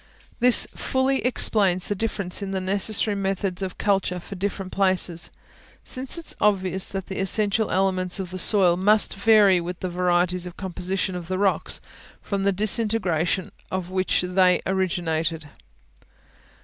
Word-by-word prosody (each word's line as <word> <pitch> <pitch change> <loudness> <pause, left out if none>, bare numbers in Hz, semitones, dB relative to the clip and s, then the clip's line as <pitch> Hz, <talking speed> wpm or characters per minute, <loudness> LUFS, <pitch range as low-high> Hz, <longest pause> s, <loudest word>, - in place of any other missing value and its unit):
This 245 0 +6
fully 265 +1 0
explains 200 -7 +1
the - - 0
difference 200 -3 -2
in 200 - -4
the 195 -1 -2
necessary 200 +3 +1
methods 195 -1 -2
of 185 -1 -5
culture 195 -3 0
for 175 - -10
different 195 0 -4
places; 185 -3 +1 0.5
since 260 +5 -4
it 335 - -7
is - - -5
obvious 190 -2 +1
that 195 -1 -5
the 190 - -6
essential 205 +2 +1
elements 185 0 0
of 185 -2 -5
the 185 - -5
soil 185 -3 +5
must 210 +3 +3
vary 200 -3 +4
with 175 +1 -6
the 185 - -3
varieties 180 0 0
of 175 - -11
composition 185 0 -2
of 175 -2 -7
the 185 +1 -2
rocks, 195 -1 0 0.4
from 200 -1 -4
the 200 - +3
disintegration 195 -4 0 0.2
of 185 -1 -4
which 185 0 0
they 180 0 +3
originated. 165 -4 -2
190 Hz, 150 wpm, -23 LUFS, 180-200 Hz, 0.5 s, This